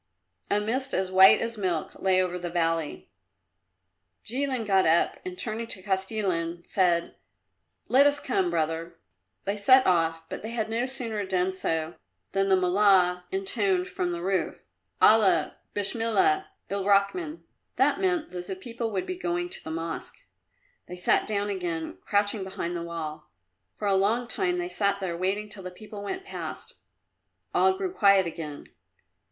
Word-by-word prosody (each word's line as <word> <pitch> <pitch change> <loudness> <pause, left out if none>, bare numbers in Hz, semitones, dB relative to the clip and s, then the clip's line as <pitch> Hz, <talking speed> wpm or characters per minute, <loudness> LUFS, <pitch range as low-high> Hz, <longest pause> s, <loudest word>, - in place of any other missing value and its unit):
A 205 - +3
mist 260 +6 -1
as 185 0 -1
white 190 +1 +7
as 230 -1 -3
milk 175 -5 -1
lay 190 -1 +3
over 180 -1 -1
the 175 0 -4
valley. 165 -2 -1 1.1
Jilin 255 -1 -1
got 195 -3 +3
up 165 +2 +2
and 180 0 -6
turning 225 +3 -3
to 190 -5 -6
Kostilin 190 -4 -1
said, 175 -3 +1 0.7
"Let 275 +3 +6
us 290 0 +2
come, 190 -8 0
brother." 165 0 -2 0.5
They 200 +1 -1
set 255 +6 +5
off, 165 -2 +1
but - - -6
they 220 - -6
had 225 -2 -3
no 235 +3 0
sooner 230 -5 -2
done 185 -1 0
so 165 -3 -2 0.3
than 195 0 +1
the 190 - +6
Mullah 180 -1 +3
intoned 190 -1 0
from 180 - -2
the 170 0 -4
roof 185 -3 -1 0.4
"Allah 190 -8 +4 0.2
Besmilla! 230 - +1 0.2
Ilrachman!" 200 - +1 0.3
That - - +2
meant 360 -4 0
that 180 -1 -6
the 190 - -4
people 230 +4 -5
would 195 -4 -2
be 370 - -4
going 350 -1 -2
to - - -6
the - - -7
Mosque. 165 +1 -5 0.6
They 180 - -7
sat 180 - +2
down 205 -1 -1
again, 165 - -4
crouching 205 0 0
behind 175 -2 -4
the 170 - -3
wall. 165 - -6 0.5
For 205 - -3
a 200 - +3
long 215 +6 +2
time 360 +6 -1
they 355 0 -2
sat 200 - 0
there 185 -3 -3
waiting 195 +4 -1
till 205 -1 -7
the 185 - -6
people 210 +2 -10
went 375 - -5
past. - - -7 0.8
All 380 0 +3
grew 380 -2 -3
quiet 200 - +5
again. 155 -3 -6
195 Hz, 160 wpm, -27 LUFS, 180-225 Hz, 1.1 s, white